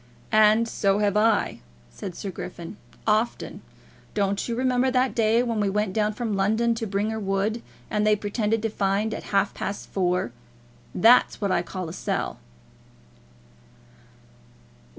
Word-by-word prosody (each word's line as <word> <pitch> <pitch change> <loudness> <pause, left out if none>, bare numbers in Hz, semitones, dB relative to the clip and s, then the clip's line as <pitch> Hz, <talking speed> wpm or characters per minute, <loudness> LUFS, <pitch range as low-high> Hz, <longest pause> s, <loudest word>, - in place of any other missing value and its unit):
"And 215 +1 +5
so 200 -3 +1
have 205 -1 +1
I," 220 +1 +2 0.3
said 180 - -7
Sir 195 - -5
Griffin; 175 +1 -8 0.3
"often. 220 +2 0 0.5
Don't 200 +1 0
you 235 - -1
remember 255 +1 +2
that 255 0 +1
day 225 +1 +3
when 230 -3 -1
we 205 -1 +1
went 210 -1 -1
down 215 0 +1
from 220 -2 -2
London 220 +4 +2
to 225 -1 -4
Bringher 210 +3 -1
Wood, 200 +3 -1 0.3
and 210 - -1
they 215 - +5
pretended 210 +1 -1
to 225 - +1
find 205 +2 0
at - - -6
half 200 0 +1
past 200 - -5
four? 180 -9 0 0.6
That's 230 +7 +5
what 200 -2 -1
I 175 - +2
call 185 0 -6
a 160 - -7
sell." - - -3
210 Hz, 150 wpm, -25 LUFS, 195-225 Hz, 0.6 s, And